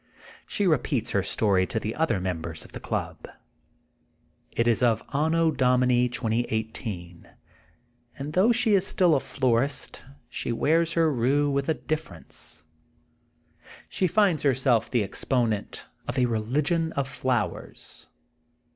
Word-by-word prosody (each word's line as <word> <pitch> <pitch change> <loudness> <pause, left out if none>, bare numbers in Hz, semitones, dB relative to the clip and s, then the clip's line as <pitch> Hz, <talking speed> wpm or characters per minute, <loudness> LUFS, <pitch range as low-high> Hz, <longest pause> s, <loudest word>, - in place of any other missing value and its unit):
She 205 - 0
repeats 145 - +1
her 100 - +2
story 95 -2 +1
to 110 - -2
the 110 0 -3
other 160 -11 +1
members 85 -3 -4
of - - -15
the - - -7
club. - - -4 1.3
It 115 - +2
is 120 0 +3
of 120 -3 +2
Anno 160 +3 +2
Domini 125 -2 +3
2018, 110 -7 -3 0.9
and 145 +2 -5
though 195 +7 +4
she 235 -2 +3
is 195 -1 +3
still 180 -3 +3
a 140 - +4
florist 130 0 -1 0.2
she - - -3
wears 165 +7 +2
her 165 -2 +3
rue 140 +4 +2
with 140 +2 -1
a 160 - +2
dif 155 0 -2
ference. 80 - -6 1.3
She 185 - +1
finds 190 -3 +3
herself 130 -4 +2
the 120 -4 +1
exponent 110 +1 -1 0.2
of 125 - -3
a 125 - +4
religion 145 +9 0
of 140 -1 -1
flowers. 130 -4 -3
130 Hz, 135 wpm, -26 LUFS, 110-155 Hz, 1.3 s, though